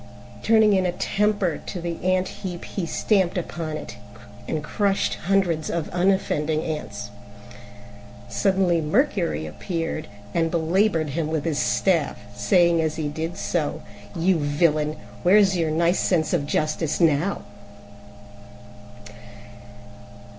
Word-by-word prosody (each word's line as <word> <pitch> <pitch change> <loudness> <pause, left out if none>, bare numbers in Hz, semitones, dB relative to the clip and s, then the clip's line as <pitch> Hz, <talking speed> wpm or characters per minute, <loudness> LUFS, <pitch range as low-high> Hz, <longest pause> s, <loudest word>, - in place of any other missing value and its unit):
Turning 220 -2 +5
in 190 -1 +2
a - - 0
temper 205 -1 0
to 185 - -4
the 170 -1 -5
ant 185 0 +2
heap 180 -3 -5
he 185 -4 -4
stamped 190 -1 +1
upon 165 -3 -4
it - - -9 0.5
and 155 -1 -2
crushed 200 +5 0
hundreds 180 -5 +1
of 170 -2 -2
unoffending 175 -4 +1
ants. 155 -1 -5 1.2
Suddenly 190 -4 +2
Mercury 170 - 0
appeared, 165 - -4 0.3
and 165 -1 +1
belaboured 165 -1 +1
him 155 +2 -1
with 155 -2 -2
his 155 -3 0
staff, 170 -5 +1 0.2
saying 170 -4 +3
as 155 -1 -1
he 155 -2 -2
did 160 +4 -4
so, 165 -6 -2 0.3
"You 175 +1 +2
villain, 150 +1 +1 0.2
where's 195 +1 +5
your 165 -3 0
nice 170 +3 +2
sense 160 -4 +1
of 145 - 0
justice 155 +1 -1
now?" 165 +3 +2
170 Hz, 120 wpm, -24 LUFS, 155-190 Hz, 1.2 s, Turning